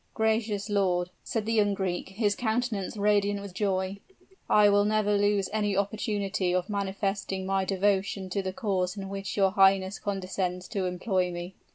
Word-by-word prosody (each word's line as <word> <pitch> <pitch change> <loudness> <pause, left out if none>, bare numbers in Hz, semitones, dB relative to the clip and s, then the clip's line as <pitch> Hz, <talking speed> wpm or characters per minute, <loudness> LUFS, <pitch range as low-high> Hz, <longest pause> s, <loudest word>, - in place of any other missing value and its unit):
"Gracious 220 -2 0
lord," 180 -4 +1
said 225 -2 -2
the 225 - 0
young 205 -2 +3
Greek, 185 -2 -2
his 205 +1 +1
countenance 220 -4 -1
radiant 205 0 +2
with 200 -2 -8
joy. 190 0 -1 0.5
"I 210 -1 +6
will 205 0 +4
never 210 0 +2
lose 205 -1 +2
any 205 -2 0
opportunity 200 -2 -1
of 180 +2 -1
manifesting 195 -1 -2
my 195 0 0
devotion 195 0 0
to 200 - 0
the 190 -1 -3
cause 190 -3 -1
in 195 -1 -5
which 195 0 -5
your 195 -1 +4
highness 195 0 +3
condescends 185 -2 -3
to 195 -4 -1
employ 180 0 0
me." 175 +2 -6
200 Hz, 165 wpm, -28 LUFS, 190-205 Hz, 0.5 s, I